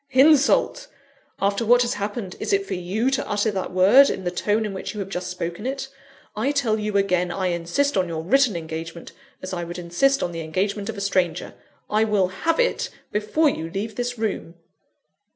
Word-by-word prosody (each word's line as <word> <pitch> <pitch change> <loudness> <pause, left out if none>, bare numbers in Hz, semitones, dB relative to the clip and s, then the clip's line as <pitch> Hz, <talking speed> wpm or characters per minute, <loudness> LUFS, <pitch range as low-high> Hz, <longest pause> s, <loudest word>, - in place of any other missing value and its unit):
"Insult! 295 - +4 0.5
After 200 +2 +1
what 245 +2 +5
has 240 - -1
happened, 205 -1 -4
is - - -2
it 395 0 +2
for - - -4
you 195 +8 -1
to 270 - -1
utter 205 +1 +1
that 190 -2 -3
word 205 +10 +6
in 190 - -3
the 175 - -1
tone 210 +4 0
in 205 - -4
which 190 +3 -6
you - - -5
have 195 -1 -4
just 180 -1 -4
spoken 180 +4 -4
it? 270 0 -4 0.5
I 230 +7 0
tell 240 -7 +1
you 210 -1 -1
again, 180 -3 +1
I 185 +1 -1
insist 175 +12 0
on 185 -2 +1
your 160 -1 -4
written 255 +2 +3
engagement 165 0 -6 0.3
as 185 - -5
I 175 -1 -3
would 170 +1 -6
insist 180 +11 +1
on 175 - -2
the 165 -1 -5
engagement 200 +6 -2
of 225 - -5
a - - -4
stranger 185 -4 0 0.3
I 215 +1 +2
will 200 -4 +2
have 325 - -1
it, - - +1 0.2
before 215 +10 +1
you 165 - -4
leave 205 +5 -4
this 245 0 -3
room!" 210 -6 -3
200 Hz, 205 wpm, -23 LUFS, 180-245 Hz, 0.5 s, word